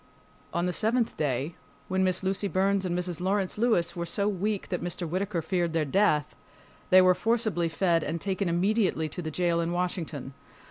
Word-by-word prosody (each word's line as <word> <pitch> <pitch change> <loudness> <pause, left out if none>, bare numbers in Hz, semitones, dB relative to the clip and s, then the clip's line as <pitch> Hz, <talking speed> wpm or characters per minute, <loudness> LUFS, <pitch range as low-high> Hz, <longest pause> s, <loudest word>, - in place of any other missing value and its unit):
On 170 +1 0
the 180 - -1
seventh 225 +4 +1
day, 145 +1 -1 0.3
when 190 0 +1
Miss 185 0 +1
Lucy 195 +2 0
Burns 195 0 +1
and 175 -1 -1
Mrs. 180 -1 -4
Lawrence 195 +1 0
Lewis 225 -7 +2
were 170 -1 -3
so 200 +4 0
weak 205 0 -1
that 180 - -2
Mr. 175 0 -3
Whittaker 185 0 -2
feared 175 -1 0
their 160 -2 +1
death, 150 -2 +2 0.5
they 185 0 +8
were 185 0 +6
forcibly 220 -5 0
fed 165 -1 +1
and 165 +2 -3
taken 195 0 -1
immediately 185 -2 +1
to 180 - -6
the 160 - -4
jail 170 +1 +1
in 170 0 -1
Washington. 165 -6 -3
180 Hz, 185 wpm, -28 LUFS, 170-195 Hz, 0.5 s, they